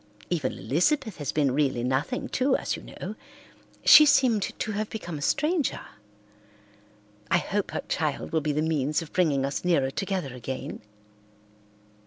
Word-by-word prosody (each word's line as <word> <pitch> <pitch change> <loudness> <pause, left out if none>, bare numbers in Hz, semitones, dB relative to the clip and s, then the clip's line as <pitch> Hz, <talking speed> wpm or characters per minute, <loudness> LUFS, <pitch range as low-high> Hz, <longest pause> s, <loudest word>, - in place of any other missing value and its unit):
Even 150 -7 0
Elizabeth 180 - 0
has 145 - -3
been 145 -3 +1
really 135 -4 +1
nothing 130 - -1
to 260 +1 +2
us, - - -2
you - - -9
know. - - -7 0.7
She 300 0 +9
seemed 255 -7 +4 0.2
to 220 - -3
have 210 +1 -3
become 175 -8 -6
a - - -9
stranger. 300 - 0 1.5
I - - +4
hope 200 +3 -2
her - - -4
child 155 -4 -2
will 160 - +1
be 150 0 -1
the 150 +1 0
means 155 0 0
of 155 - -14
bringing 145 -7 +2
us 140 - -3
nearer 145 -7 +2
together 185 -6 -3
again." 125 +1 -6
160 Hz, 155 wpm, -26 LUFS, 140-215 Hz, 1.5 s, She